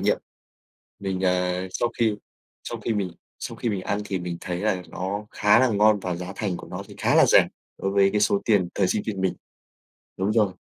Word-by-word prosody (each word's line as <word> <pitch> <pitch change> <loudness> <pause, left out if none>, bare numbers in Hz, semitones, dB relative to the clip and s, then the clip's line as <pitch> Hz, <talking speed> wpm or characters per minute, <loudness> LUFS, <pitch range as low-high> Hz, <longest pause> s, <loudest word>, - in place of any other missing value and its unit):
nghiệm. - - +2 0.8
Mình, 95 -1 -2
ờ 90 0 +1
sau 120 - 0
khi 110 -3 +3 0.5
sau - - -5
khi 115 - -1
mình 100 -4 -1 0.3
sau - - -5
khi 120 - -2
mình 100 -3 -1
ăn 100 - -1
thì 95 -2 -2
mình 90 -1 -4
thấy 90 -1 -3
là 95 -4 0
nó 100 +3 -4
khá 105 +2 +4
là 130 - +5
ngon 105 0 +4
và 90 -2 -3
giá 90 +2 -6
thành 100 -5 -2
của - - -10
nó - - -6
thì - - -12
khá - - +2
là - - +7
rẻ - - +6 0.3
đối 95 - -1
với 100 0 +4
cái 105 - +1
số 100 -1 +3
tiền 100 -5 +3
thời 95 - +2
sinh 105 - 0
viên 100 -3 -3
mình. 95 - +1 0.8
Đúng 95 +3 +1
rồi. 105 -5 +1
100 Hz, 225 wpm, -25 LUFS, 90-105 Hz, 0.8 s, là